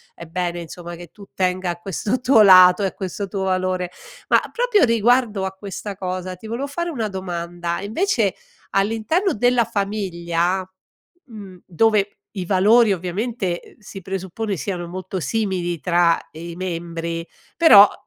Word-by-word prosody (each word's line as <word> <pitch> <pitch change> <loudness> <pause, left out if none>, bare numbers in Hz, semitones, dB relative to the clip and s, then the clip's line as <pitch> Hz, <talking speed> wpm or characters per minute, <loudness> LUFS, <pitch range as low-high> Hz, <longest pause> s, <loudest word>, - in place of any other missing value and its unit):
è 170 - -10
bene, 175 0 -3
insomma, 175 +1 -8
che 175 +1 -10
tu 205 - -14
tenga 185 -1 0
a 170 - -6
questo 200 +6 -2
tuo 250 -3 +5
lato 185 0 +8
e - - +2
a - - -6
questo 195 +1 -5
tuo 195 -1 -3
valore. 185 -1 -1 0.4
Ma, - - +6
proprio 480 -6 +2
riguardo 230 -3 +2
a 190 - -3
questa 200 +1 -7
cosa, 185 -1 -4
ti 180 - -15
volevo 240 +5 -3
fare 340 +5 -3
una 225 -8 -2
domanda, 175 -2 -4
e - - -6
invece, 225 - 0 0.4
all'interno 225 - +1
della 245 +1 +2
famiglia, 190 -4 -1 0.6
mhmm, 200 -7 -12
dove 205 +2 +1 0.2
i 185 - -3
valori 205 +4 +4
ovviamente, 185 +1 -3
uhm, - - -17
si 200 -2 -10
presuppone, 195 +3 -4
siano 175 0 -4
molto 185 +1 -5
simili 180 -4 -2
tra, 170 +1 +3
ehm, 165 +2 -9
i 170 - -7
membri 170 -2 -4 0.3
però, 320 -12 +9
uhm, 205 - +5
190 Hz, 160 wpm, -21 LUFS, 175-215 Hz, 0.6 s, però